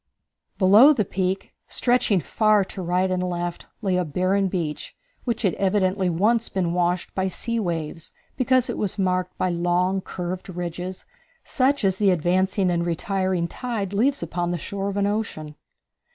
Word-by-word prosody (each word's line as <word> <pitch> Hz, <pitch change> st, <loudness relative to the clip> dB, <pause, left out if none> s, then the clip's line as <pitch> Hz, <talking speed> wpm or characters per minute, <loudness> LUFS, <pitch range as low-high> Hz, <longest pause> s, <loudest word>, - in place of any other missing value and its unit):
Below 210 Hz, +10 st, +7 dB
the 215 Hz, -7 st, 0 dB
peak, 190 Hz, +1 st, -2 dB
stretching 240 Hz, -6 st, +2 dB
far 215 Hz, +5 st, +3 dB
to 190 Hz, -, -8 dB
right 180 Hz, +2 st, +1 dB
and 185 Hz, 0 st, 0 dB
left, 175 Hz, -1 st, -3 dB, 0.2 s
lay 190 Hz, -2 st, +1 dB
a 180 Hz, -, +1 dB
barren 185 Hz, +5 st, +1 dB
beach 170 Hz, -5 st, -4 dB, 0.3 s
which 235 Hz, -2 st, -2 dB
had 195 Hz, -, +2 dB
evidently 190 Hz, -1 st, +1 dB
once 215 Hz, +7 st, +1 dB
been 175 Hz, -3 st, -1 dB
washed 175 Hz, 0 st, 0 dB
by 190 Hz, 0 st, 0 dB
sea 230 Hz, +5 st, -3 dB
waves, 165 Hz, -4 st, -4 dB, 0.2 s
because 255 Hz, -1 st, +2 dB
it -, -, -4 dB
was 205 Hz, 0 st, -1 dB
marked 185 Hz, -2 st, -1 dB
by 185 Hz, -, 0 dB
long 175 Hz, +2 st, +1 dB
curved 180 Hz, +1 st, -5 dB
ridges 180 Hz, +1 st, -5 dB, 0.4 s
such 270 Hz, -3 st, +1 dB
as 190 Hz, -1 st, +2 dB
the 205 Hz, -1 st, +3 dB
advancing 185 Hz, +2 st, +1 dB
and 170 Hz, -1 st, 0 dB
retiring 185 Hz, +1 st, -1 dB
tide 215 Hz, -3 st, -4 dB
leaves 260 Hz, +5 st, +1 dB
upon 175 Hz, +1 st, -2 dB
the 175 Hz, -, -1 dB
shore 195 Hz, +4 st, -4 dB
of 200 Hz, -, -4 dB
the 200 Hz, 0 st, +1 dB
ocean. 200 Hz, -8 st, -3 dB
185 Hz, 165 wpm, -24 LUFS, 175-205 Hz, 0.4 s, Below